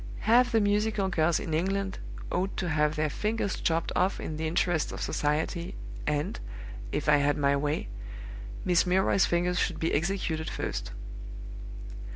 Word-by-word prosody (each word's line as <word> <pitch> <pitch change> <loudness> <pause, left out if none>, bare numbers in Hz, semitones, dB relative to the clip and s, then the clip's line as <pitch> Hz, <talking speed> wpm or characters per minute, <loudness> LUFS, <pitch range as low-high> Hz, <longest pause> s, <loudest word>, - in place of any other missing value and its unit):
Half 245 +3 +5
the 225 - +6
musical 205 -1 +2
girls 165 -2 +3
in 160 - -4
England 190 +4 0 0.3
ought 190 +2 -1
to 180 - -1
have 150 0 +2
their 155 0 +1
fingers 210 +5 -1
chopped 165 0 +1
off 185 +2 +2
in 155 - -4
the 160 +1 -1
interests 170 0 +1
of - - -6
society, 155 +3 -1 0.3
and, 150 0 0 0.5
if 150 - -1
I 150 -1 +7
had 145 0 +2
my 140 -1 +3
way, 145 +2 -1 0.8
Miss 180 0 +4
Milroy's 190 +1 +4
fingers 175 +1 +1
should - - 0
be 165 - 0
executed 160 -1 0
first. - - -3
170 Hz, 155 wpm, -29 LUFS, 150-195 Hz, 0.8 s, I